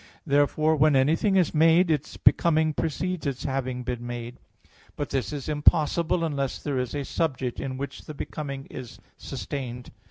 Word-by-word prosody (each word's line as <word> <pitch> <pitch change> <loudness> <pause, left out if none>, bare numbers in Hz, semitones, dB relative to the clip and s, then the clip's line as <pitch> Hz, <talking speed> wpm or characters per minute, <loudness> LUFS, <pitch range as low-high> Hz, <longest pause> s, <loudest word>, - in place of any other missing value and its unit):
Therefore 155 +2 +3
when 150 -1 +4
anything 160 +9 +3
is 180 -4 +3
made, 165 +2 +5
its 150 -1 -2
becoming 160 -2 +4
precedes 165 +2 -2
its 135 -3 -3
having 130 -2 -2
been 125 -1 -4
made. 120 0 -6 0.6
But 145 - -4
this 130 -7 -1
is 145 -3 -5
impossible, 160 +3 +2
unless 140 -4 -1
there 140 -3 -2
is 125 +2 -3
a 140 -1 -2
subject 130 -7 -2
in 130 -1 -4
which 140 +1 -6
the 155 - -8
becoming 140 -2 -5
is 125 -3 -8 0.2
sustained. 125 -3 -6
145 Hz, 160 wpm, -26 LUFS, 130-160 Hz, 0.6 s, made